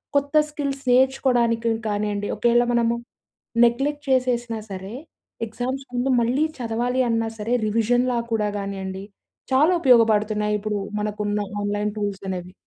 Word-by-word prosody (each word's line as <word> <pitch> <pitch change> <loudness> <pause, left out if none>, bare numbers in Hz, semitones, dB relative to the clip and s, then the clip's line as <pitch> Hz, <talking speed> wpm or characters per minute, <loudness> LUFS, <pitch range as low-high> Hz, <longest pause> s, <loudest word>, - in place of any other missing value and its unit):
కొత్త 285 +1 +1 0.2
స్కిల్స్ 280 -2 -4
నేర్చుకోవడానికి 245 -3 +2 0.2
కానియండి, 205 0 -1
ఒకవేళ 240 0 +3
మనము 235 0 +2 0.7
నెగ్లెక్ట్ 285 +5 0
చేసేసినా 240 -3 +1
సరే, 190 +2 -6 0.5
ఎగ్జామ్స్ 255 +4 -4
ముందు 245 +2 0
మళ్ళీ 255 +7 +2
చదవాలి 245 +2 0
అన్నా 225 -1 0
సరే, 230 +4 0
రివిజన్‍లా 240 +3 +1
కూడా 210 -2 +1
కానియండి, 195 -1 -5 0.5
చాలా 300 +6 +5
ఉపయోగపడుతున్నాయి. 215 -5 +3
ఇప్పుడు 210 -1 -2 0.2
మనకున్న 210 0 -2 0.2
ఆన్‍లైన్ 205 0 -1
టూల్స్ 200 -1 -3
అనేవి. 180 0 -5
230 Hz, 120 wpm, -23 LUFS, 210-250 Hz, 0.7 s, చాలా